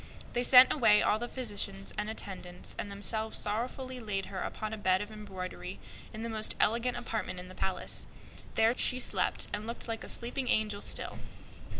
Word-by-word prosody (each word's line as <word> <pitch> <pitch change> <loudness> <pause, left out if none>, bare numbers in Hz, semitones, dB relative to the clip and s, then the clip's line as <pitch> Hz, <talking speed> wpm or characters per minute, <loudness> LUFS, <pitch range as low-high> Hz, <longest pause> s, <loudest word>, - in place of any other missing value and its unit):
They 240 - +1
sent 250 +1 +9
away 220 -7 +5
all 215 - +3
the 240 - -3
physicians 205 -6 -3
and 210 +1 -2
attendants, 185 -4 -5
and 205 - -3
themselves 220 +2 +1
sorrowing 250 +4 -2
laid 195 -3 -2
her 190 -2 -6
upon 215 0 -4
a - - -3
bed 185 -2 +3
in 205 +1 -5
the - - -11 0.2
finest 215 +4 -4
apartment 230 -4 0
in 180 0 -9
the - - -10
palace. 190 +1 0 0.5
There 225 +2 +4
she 250 - +3
slept 255 - +2
and 210 +1 -3
looked 235 +1 -4
like 225 -1 -4
a - - -6
sleeping 245 +2 -2
angel 210 -2 +1
still. - - -2
215 Hz, 170 wpm, -31 LUFS, 200-235 Hz, 0.5 s, sent